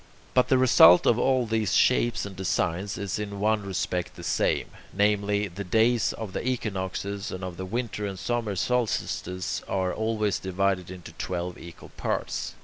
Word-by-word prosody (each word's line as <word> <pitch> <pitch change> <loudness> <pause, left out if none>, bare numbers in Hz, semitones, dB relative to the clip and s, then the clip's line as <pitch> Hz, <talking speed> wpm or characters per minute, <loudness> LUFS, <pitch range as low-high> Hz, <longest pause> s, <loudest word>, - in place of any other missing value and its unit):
But 125 -1 +4
the 130 - +4
result 90 -9 +7
of 120 - +4
all 130 -1 +2
these 110 -2 0
shapes 120 -3 +3
and 100 -1 -8
designs 95 +1 -1
is 100 +1 -3
in 100 -1 -5
one 105 +1 +2
respect 90 -2 -3
the - - -10
same: - - +1 0.3
namely, 105 0 +1
the 95 +2 -7
days 110 +4 +2
of 110 -4 -7
the - - -3
equinoxes 100 -4 -3
and 90 0 -6
of 90 -2 -5
the 95 +1 -6
winter 110 -1 -3
and 95 -1 -6
summer 115 -1 -2
solstices 100 -5 -1
are 95 -1 -1
always 110 -3 0
divided 95 -1 -1
into 90 -3 -9
twelve 90 -1 -3
equal 85 -1 -12
parts. - - -3
100 Hz, 165 wpm, -26 LUFS, 95-110 Hz, 0.3 s, result